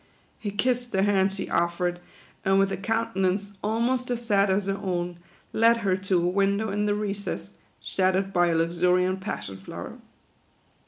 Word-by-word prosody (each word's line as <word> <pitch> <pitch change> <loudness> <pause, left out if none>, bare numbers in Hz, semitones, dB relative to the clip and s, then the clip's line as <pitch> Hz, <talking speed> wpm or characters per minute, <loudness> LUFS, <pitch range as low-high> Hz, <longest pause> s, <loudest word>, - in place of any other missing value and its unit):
He 210 - -3
kissed 245 +4 0
the 190 0 +2
hand 195 -1 +3
she 195 0 -4
offered, 175 +1 0 0.4
and 195 0 +3
with 195 0 +3
a - - 0
countenance 200 -2 0
almost 235 +4 0
as 240 -1 -2
sad 200 -3 +3
as 190 +1 +1
her 195 - 0
own, 175 -2 -2 0.3
led 230 +1 +5
her 185 -1 +3
to 185 -2 0
a - - +2
window 200 +3 +1
in 210 +1 0
the 205 - +2
recess, 205 -1 -4 0.3
shadowed 190 +1 0
by 175 -1 +4
a 170 - +1
luxuriant 180 +3 +2
Passion 95 - -5
Flower. 95 - -8
195 Hz, 165 wpm, -26 LUFS, 180-210 Hz, 0.4 s, led